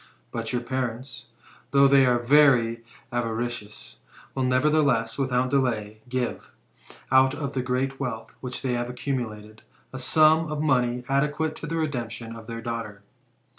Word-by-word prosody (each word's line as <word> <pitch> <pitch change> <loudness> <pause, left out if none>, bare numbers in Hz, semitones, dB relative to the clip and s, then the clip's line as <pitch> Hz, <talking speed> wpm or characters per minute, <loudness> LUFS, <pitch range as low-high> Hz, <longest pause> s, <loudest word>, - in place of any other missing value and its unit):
But 115 -1 -3
your 125 -1 -1
parents, 125 -1 -4 0.4
though 140 0 +5
they 135 -1 +5
are 125 -1 +3
very 120 -3 +4 0.3
avaricious, 115 - -4 0.4
will 135 - -2
nevertheless, 130 -2 +2
without 130 -1 +1
delay, 110 -6 0
give, 125 -1 -3 0.6
out 130 +1 +5
of 145 -2 -4
the 130 - -1
great 130 +2 -2
wealth 115 -4 -5
which 125 -1 -6
they 130 -2 0
have 120 0 -2
accumulated, 110 -5 -5 0.3
a 130 - -5
sum 155 +3 +4
of 150 - -3
money 125 -4 +1
adequate 150 +3 0
to 165 - -7
the 165 - -3
redemption 120 -7 -3
of 115 -1 -11
their 115 -1 -6
daughter." 115 -4 -5
125 Hz, 145 wpm, -25 LUFS, 115-135 Hz, 0.6 s, though